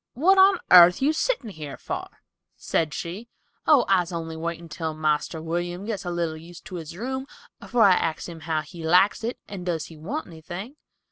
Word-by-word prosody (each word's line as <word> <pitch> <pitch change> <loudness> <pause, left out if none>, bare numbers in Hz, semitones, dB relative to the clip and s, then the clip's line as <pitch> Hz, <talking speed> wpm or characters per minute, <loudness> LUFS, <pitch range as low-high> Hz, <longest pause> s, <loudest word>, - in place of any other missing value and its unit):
"What 375 +9 +4
on 385 +1 +7
airth 180 0 +9
you 285 +3 +2
sittin' 315 - -1
here 150 -5 -8
for?" - - -5 0.5
said 160 -2 -1
she. 185 +10 -6 0.4
"Oh, 295 -6 +6
I's 180 -2 +2
only 165 -1 -5
waitin' 170 +1 -5
till 160 -1 -4
Marster 155 +1 0
William 175 +3 -3
gets 210 -4 -4
a - - -2
little 170 -2 -2
used 170 +2 -13
to 190 -4 -7
his 165 0 -8
room 265 +4 -4 0.3
afore 240 -3 +2
I 200 - +7
axes 165 -3 0
him 165 -1 -9
how 160 0 -1
he 165 +2 -10
likes 180 +7 +4
it 235 +2 -3
and 195 -3 -7
does 170 -3 -2
he 160 - -12
want 225 - -4
anything." 175 - -8
175 Hz, 195 wpm, -25 LUFS, 160-215 Hz, 0.5 s, airth